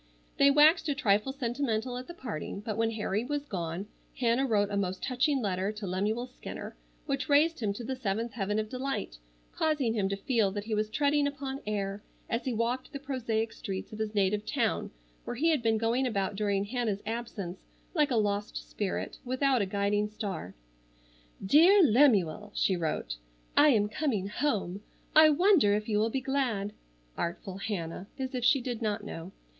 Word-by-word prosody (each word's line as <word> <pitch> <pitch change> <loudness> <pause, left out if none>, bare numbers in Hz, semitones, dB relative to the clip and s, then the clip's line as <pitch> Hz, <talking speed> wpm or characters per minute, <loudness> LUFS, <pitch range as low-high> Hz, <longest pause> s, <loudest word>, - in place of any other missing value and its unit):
They 280 - +6
waxed 300 +3 +5
a 285 - +1
trifle 215 -2 +2
sentimental 245 -2 -2
at 250 +1 -6
the 345 - -9
parting, 210 - -5
but 215 0 -3
when 225 +1 +1
Harry 215 -1 -1
was 290 +2 -3
gone, 175 - -4 0.3
Hannah 245 +2 +2
wrote 205 -3 +2
a - - -1
most 190 -2 -2
touching 265 +1 +1
letter 190 0 0
to 210 -1 -6
Lemuel 205 +6 -1
Skinner 255 - -8 0.3
which 275 -2 -2
raised 310 +3 +4
him 215 -4 0
to 235 - -7
the 260 +3 -3
seventh 230 -1 -2
heaven 205 -1 -1
of 215 0 -1
delight, 255 - -4 0.3
causing 295 -8 +1
him 200 -4 0
to 195 - -1
feel 220 -1 +1
that 205 0 -3
he 220 +1 -4
was 215 0 0
treading 285 +4 +2
upon 275 -1 -4
air 200 -1 -2 0.3
as 230 - -1
he 260 - 0
walked 235 +4 -1
the 280 - -5
prosaic 230 -5 -2
streets 195 0 -6
of 215 - -7
his 220 0 -3
native 205 +1 +2
town - - 0 0.3
where - - -5
he 325 +7 +3
had 300 -5 +1
been 225 -1 +2
going 235 +4 +1
about 200 -4 -1
during 200 -1 0
Hannah's 220 -3 -2
absence 215 -5 -4 0.3
like 305 -4 +3
a 250 - 0
lost 205 -1 0
spirit 205 -3 -3
without 260 -1 +2
a 200 - 0
guiding 205 +1 0
star. 200 - -5 0.9
"DEAR 345 - +7
LEMUEL:" 210 - +4
she 190 - +2
wrote:— 155 - -2 0.4
"I 300 - +7
am 210 -6 +3
coming 215 -5 -1
home. 205 -8 -1 0.3
I 310 0 +9
wonder 305 - +5
if 210 0 -2
you 210 -2 +1
will 220 +2 +2
be 265 +3 -2
glad? 245 -7 -1 0.4
(Artful 185 +2 -4
Hannah, 190 -3 -4
as 265 -1 -4
if 250 -2 -2
she 265 +2 +4
did 240 -2 -4
not 210 -1 -1
know!) 170 -3 -7
225 Hz, 185 wpm, -30 LUFS, 200-265 Hz, 0.9 s, I